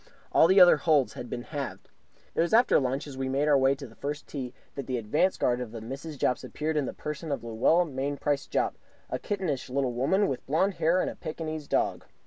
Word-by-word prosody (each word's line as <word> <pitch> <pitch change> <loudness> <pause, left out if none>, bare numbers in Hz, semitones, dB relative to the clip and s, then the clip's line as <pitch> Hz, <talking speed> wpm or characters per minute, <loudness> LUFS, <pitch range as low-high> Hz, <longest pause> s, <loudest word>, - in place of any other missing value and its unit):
All 160 - +6
the 190 +3 +6
other 180 -3 +8
holes 150 -4 +2
had 120 - -7
been 120 - -4
halved. 140 0 -6 0.5
It - - +1
was 170 +6 +3
after 240 +2 +5
lunch, 135 +1 -1
as 135 -3 -9
we 130 0 -1
made 140 +3 +1
our 150 - +5
way 135 0 +4
to 140 0 -9
the 115 - -13
first 145 +4 -5
tee, 130 -4 -5 0.2
that 140 - -6
the 130 -1 -1
advance 150 - +1
guard 125 0 +1
of 120 -3 -5
the 115 - -6
Mrs. 135 +7 -7
Jopps 125 - 0
appeared 155 +1 -3
in 145 -4 +1
the - - -3
person 150 +1 -5
of 140 - -2
Luella 120 +10 +3
Mainprice 140 0 -2
Jopp, - - 0 0.3
a - - -1
kittenish 175 -11 -3
little 130 -1 0
woman 190 - +2
with 130 - -3
blond 175 +8 +2
hair 170 +3 +3
and - - -1
a - - -11
Pekingese 155 -2 -5
dog. - - 0
145 Hz, 230 wpm, -28 LUFS, 130-160 Hz, 0.5 s, other